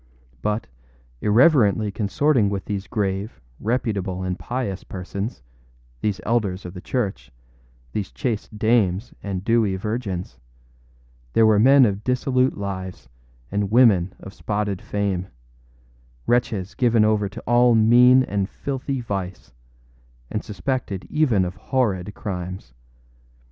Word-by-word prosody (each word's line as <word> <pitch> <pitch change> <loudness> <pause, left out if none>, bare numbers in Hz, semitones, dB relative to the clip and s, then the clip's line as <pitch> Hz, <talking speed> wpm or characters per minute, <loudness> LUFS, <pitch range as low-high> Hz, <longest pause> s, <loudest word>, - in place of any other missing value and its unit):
But, 105 +5 -1 0.6
irreverently 110 -3 +4
consorting 110 +3 +2
with 100 -1 -3
these 100 -2 -4
grave, 100 -1 -2 0.2
reputable, 100 -5 -1
and 90 0 -3
pious 120 -6 -3
people, 100 +3 -4 0.7
these 105 -1 -1
elders 100 -5 -1
of 90 - -7
the 90 - -8
church, 105 - -3 0.6
these 100 - -3
chaste 110 -3 -3
dames 110 -1 +1
and 95 -2 -4
dewy 110 -3 +2
virgins, 95 - -4 0.9
there 115 - +5
were 110 -1 +5
men 135 +3 +7
of 100 -1 -1
dissolute 125 +1 +1
lives 95 -9 -6 0.4
and 100 0 -1
women 105 -6 +4
of 95 - -10
spotted 105 -3 -2
fame, 100 -3 -2 1.0
wretches 110 -6 0
given 115 -3 +3
over 105 -2 +1
to 110 +4 -9
all 120 0 +4
mean 125 +4 +6
and 100 -4 -2
filthy 135 -1 -4
vice, 95 - -5 0.8
and 105 - -2
suspected 105 -1 -3
even 125 -12 +2
of 90 - -4
horrid 105 -8 -1
crimes. 90 - -6
105 Hz, 120 wpm, -23 LUFS, 95-120 Hz, 1.0 s, men